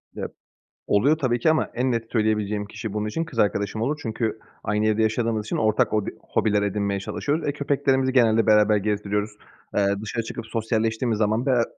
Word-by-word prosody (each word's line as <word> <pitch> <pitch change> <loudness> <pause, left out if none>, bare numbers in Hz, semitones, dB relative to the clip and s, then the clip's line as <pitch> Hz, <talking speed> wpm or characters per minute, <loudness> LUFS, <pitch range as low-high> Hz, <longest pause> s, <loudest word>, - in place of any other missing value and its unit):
Ya, - - -3 0.6
oluyor 140 +10 +3
tabii 125 -5 +1
ki 140 - +3
ama 155 - +1
en 125 +1 +1
net 115 -1 -3
söyleyebileceğim 105 -2 0
kişi 110 0 -6
bunun 105 0 -2
için 165 +10 -2
kız 150 -8 -10
arkadaşım 100 0 +1
olur 145 +6 0
çünkü 110 -1 -2 0.3
aynı 105 +1 +1
evde 110 +1 +2
yaşadığımız 110 -1 0
için - - -2
ortak 110 -1 +2
hobi 105 -2 0
hobiler 105 -2 +1
edinmeye 100 -1 -1
çalışıyoruz. 145 +10 -2
E, - - +1
köpeklerimizi 140 -2 +1
genelde 115 -3 +4
beraber 105 -1 +5
gezdiriyoruz. 105 0 -1 0.5
Eee, 100 -1 +3
dışarı 115 +2 -3
çıkıp 115 0 -6
sosyalleştiğimiz 115 0 -1
zaman 110 +4 +1
bera 125 -3 +3
110 Hz, 180 wpm, -24 LUFS, 105-120 Hz, 0.6 s, beraber